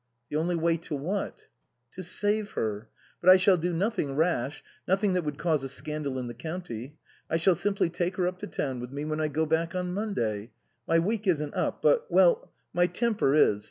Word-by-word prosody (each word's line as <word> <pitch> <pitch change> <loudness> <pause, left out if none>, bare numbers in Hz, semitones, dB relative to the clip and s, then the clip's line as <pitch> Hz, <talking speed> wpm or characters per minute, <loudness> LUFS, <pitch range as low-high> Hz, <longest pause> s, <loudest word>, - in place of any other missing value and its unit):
" 120 +1 -50
The - - -3
only 170 +3 +1
way 165 0 +2
to 160 -2 -5
what? 180 +9 -3 0.2
" 120 0 -50
"To 185 - -7
save 205 +3 0
her. 110 0 -3 0.3
But 180 - +5
I 185 - +10
shall 185 +1 +5
do 175 +2 -1
nothing 175 -5 -1
rash, 150 -4 0 0.2
nothing 195 +1 +2
that 180 -1 +1
would 150 -2 -4
cause 155 -5 +1
a 135 - -3
scandal 150 -1 -3
in 125 - -3
the 120 - -6
county. 145 -2 -6 0.3
I 165 - +2
shall 180 +3 +4
simply 195 +2 +1
take 175 +2 -2
her 185 - +1
up 180 +1 -2
to - - -5
town 130 -3 -3
with 125 0 -6
me 145 +2 -4
when 155 0 -2
I 155 - +1
go 155 +2 0
back 165 +2 0
on 180 -1 -2
Monday. 120 - -2 0.4
My 165 - +4
week 210 +5 0
isn't 150 -5 +1
up; - - -2
but - - +3
well - - +4 0.2
my 175 0 +3
temper 215 - +1
is. 105 -9 +4
165 Hz, 220 wpm, -28 LUFS, 140-185 Hz, 0.4 s, I